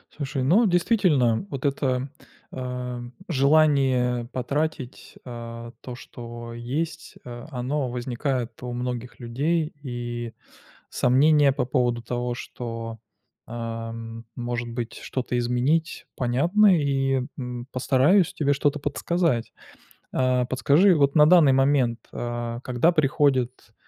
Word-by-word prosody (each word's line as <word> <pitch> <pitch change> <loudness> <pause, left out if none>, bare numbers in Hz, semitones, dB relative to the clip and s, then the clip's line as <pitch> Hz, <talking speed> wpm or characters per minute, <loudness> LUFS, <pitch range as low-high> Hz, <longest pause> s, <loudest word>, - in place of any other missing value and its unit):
Слушай, 135 -3 -3
ну 200 - +4
действительно, 175 - +2
вот 140 -1 -5
это, 135 -1 0 0.4
эм, 125 -1 -5 0.2
желание 135 -5 +3
потратить, 140 +1 -3
э, 115 -1 -8
то, 125 -1 -8
что 120 -2 -9
есть, 150 +8 -4
э, 120 -1 -8
оно 130 +1 -2
возникает 125 -1 -3
у 125 -1 -5
многих 125 0 -5
людей, 150 +7 -1
и 120 -3 -5 0.6
сомнения 140 +3 +4
по 130 - -1
поводу 120 -2 0
того, 120 +1 -3
что, 115 -2 -6 0.5
эм, 115 0 -6
может 120 0 -3
быть, 115 -1 -4
что-то 125 -1 -3
изменить, 125 +7 0
понятны, 170 - +3
и, 135 -2 +1
м, 125 -1 -6
постараюсь 140 +8 +3
тебе 145 -2 +1
что-то 145 +1 0
подсказать. 145 -3 -1 0.6
Э, 125 -1 +1
подскажи, 145 +9 +4
вот 140 -2 +2
на 150 -1 +7
данный 155 -5 +6
момент, 135 -3 +2
э, 120 0 -4
когда 125 +7 +3
приходит, 135 -6 +1
125 Hz, 115 wpm, -25 LUFS, 120-145 Hz, 0.6 s, на